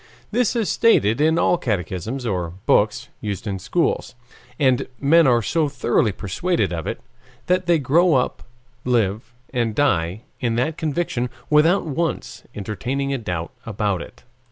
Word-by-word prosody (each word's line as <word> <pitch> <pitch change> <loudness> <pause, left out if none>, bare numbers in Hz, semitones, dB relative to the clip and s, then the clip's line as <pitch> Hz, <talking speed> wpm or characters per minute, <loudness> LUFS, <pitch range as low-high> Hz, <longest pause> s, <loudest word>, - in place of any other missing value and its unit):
This 245 +1 +1
is 225 -4 0
stated 115 - +3
in 160 +2 +3
all 175 - +3
catechisms 105 +4 -3
or 90 -6 -2
books 105 -1 +2
used 105 0 -4
in 100 -2 -3
schools. 125 - -1 0.4
And 130 -3 +2
men 160 +2 +5
are 120 -3 +3
so 155 +5 +1
thoroughly 120 -5 +1
persuaded 100 - -1
of 80 -2 -4
it - - -3 0.5
that 180 0 +1
they 170 -1 +5
grow 155 +4 +3
up, 125 - 0 0.4
live 115 -3 0 0.2
and 115 -4 0
die 95 -8 +1 0.2
in 115 -2 0
that 130 +7 0
conviction 155 -6 -2 0.2
without 165 +6 +4
once 165 +2 -3
entertaining 130 +7 -3
a 135 - -1
doubt 90 -6 -4
about 105 -4 -1
it. - - -12
125 Hz, 150 wpm, -22 LUFS, 105-160 Hz, 0.5 s, men